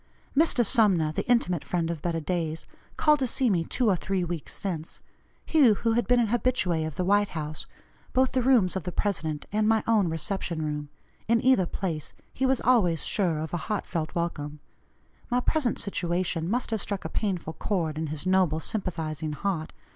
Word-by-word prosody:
Mr. 275 -5 +4
Sumner, 195 -10 +3
the 155 - -4
intimate 180 -10 +2
friend 170 -2 -1
of 165 -3 -5
better 170 0 -1
days, 165 -1 -2 0.3
called 300 -1 +4
to 260 - +1
see 245 0 +1
me 170 -3 +2
two 245 +8 -1
or 200 - +4
three 190 +1 -1
weeks 170 -4 -4
since 170 -5 -5 0.5
he 305 -5 +5
who 230 +3 0
had 235 -3 +1
been 245 0 +4
an 230 -3 +2
habitué 200 -9 +1
of 155 - -7
the 180 - -1
White 205 +1 +3
House 155 0 -5 0.4
both 260 0 +2
the 260 - +1
rooms 240 -8 +4
of 190 - -1
the 180 - -5
President 160 -7 -2
and 215 +1 +1
my 220 -1 +3
own 215 -6 +3
reception 165 0 -3
room, 150 -1 -4 0.4
in 230 +1 +4
either 255 -9 +4
place 165 -6 -4 0.2
he 265 - 0
was 265 -1 +2
always 200 -10 +3
sure 180 -6 +1
of 155 +2 -5
a - - +1
heartfelt 170 -6 -2
welcome; 150 -3 -3 0.7
my 245 0 +2
present 255 -1 +1
situation 175 -4 -1
must 240 +2 -1
have 220 -2 0
struck 200 -2 -4
a - - 0
painful 185 -6 -2
chord 165 -7 -1
in 160 +1 -3
his 150 +2 -5
noble, 185 -4 +3
sympathizing 160 -6 -2
heart. 165 -1 -2
185 Hz, 190 wpm, -27 LUFS, 160-225 Hz, 0.7 s, he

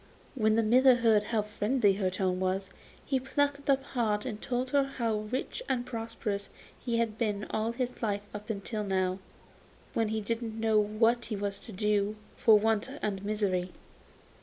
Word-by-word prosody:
When 220 -5 +2
the 225 - +3
miller 255 +3 +6
heard 225 -3 +3
how 220 -2 0
friendly 210 +1 +2
her 190 -1 0
tone 185 0 -1
was, 190 +1 -1 0.3
he 270 -2 +1
plucked 280 +2 -1
up 270 -1 +4
heart 220 -5 -1
and 215 -5 -5
told 255 +1 -2
her 280 -1 +4
how 235 -5 -1
rich 230 - -4
and 245 -2 0
prosperous 225 -4 -4 0.3
he 235 -1 0
had 225 -2 -1
been 210 -3 -1
all 220 +1 0
his 250 0 -3
life 205 -3 -1
up 210 +1 -8
till 215 0 -3
now, 190 -1 0 0.7
when 225 -1 +1
he 220 +1 -1
didn't 225 +1 -3
know 220 -1 +3
what 225 +3 +2
he 220 - -3
was 200 0 -3
to - - -8
do 210 +1 +1 0.2
for 220 -1 +6
want 220 +2 +1
and 195 -2 -2
misery. 200 -4 -1
215 Hz, 175 wpm, -30 LUFS, 205-240 Hz, 0.7 s, miller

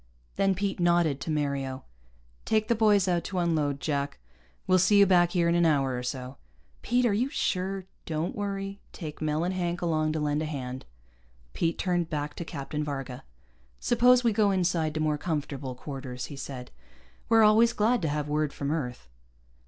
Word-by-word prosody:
Then 195 -1 +2
Pete 195 0 -2
nodded 170 -5 +2
to - - -5
Mario. 140 -3 -2 0.6
"Take 215 +1 +1
the - - +5
boys 210 -4 +3
out 175 -2 +1
to 190 - -4
unload, 155 -5 +1
Jack. 140 -2 -2 0.5
We'll 185 0 +4
see 200 +3 +4
you 200 - +8
back 175 -2 +4
here 170 -2 +2
in 170 - +3
an 175 0 +3
hour 140 -5 +2
or 125 - -3
so." 125 +1 -5 0.4
"Pete, 245 +1 +1
are 225 - +3
you 240 +6 +1
sure 190 - -2
" - - -40
"Don't 160 +1 -2
worry. 195 -1 -4
Take 155 -4 -7
Mel 155 +1 0
and 180 +2 -1
Hank 175 -1 -2
along 155 -2 0
to 155 - -1
lend 150 0 0
a - - -1
hand." 130 -4 -5 0.7
Pete 165 0 0
turned 175 -3 0
back 150 -1 -3
to - - -3
Captain 150 -1 -4
Varga. 135 -4 -5 0.6
"Suppose 245 +1 +4
we 230 -2 +3
go 205 -1 +3
inside 175 -5 0
to - - -1
more 155 -1 0
comfortable 140 -5 -3
quarters," 130 -2 -6
he - - -7
said. 130 -2 -7 0.6
"We're 225 -1 +6
always 220 +2 +6
glad 235 +2 +2
to 160 - 0
have 150 0 -2
word 150 -1 0
from 140 0 -3
Earth." 125 - -3
165 Hz, 190 wpm, -28 LUFS, 145-195 Hz, 0.7 s, you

